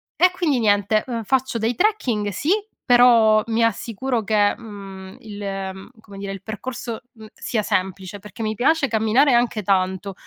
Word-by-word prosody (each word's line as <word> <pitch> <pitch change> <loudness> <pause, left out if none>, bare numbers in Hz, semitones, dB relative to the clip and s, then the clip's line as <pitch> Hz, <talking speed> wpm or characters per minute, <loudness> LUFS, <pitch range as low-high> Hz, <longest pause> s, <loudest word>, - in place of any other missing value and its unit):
e 360 0 +4
quindi 315 -8 0
niente, 205 0 +2
uhm, 235 -3 -3
faccio 260 +2 0
dei 230 +2 -1
trekking, 245 - 0
sì, 285 - -2 0.3
però 235 -3 +5
mi 230 0 +1
assicuro 230 +2 -1
che, 205 0 +2
uhm, 195 -4 -10
il, 210 -2 -9 0.3
uhm, 190 +1 -12
come 200 -2 -13
dire, 195 0 -5
il 195 - -9
percorso, 230 +1 -6
mh, 220 -3 -13
sia 220 -3 -3
semplice 190 +1 -3
perché 210 +3 -9
mi 215 0 -2
piace 280 +4 +2
camminare, 225 +5 +3
e - - +3
anche 235 -2 +1
tanto, 190 0 0
220 Hz, 170 wpm, -21 LUFS, 200-245 Hz, 0.3 s, però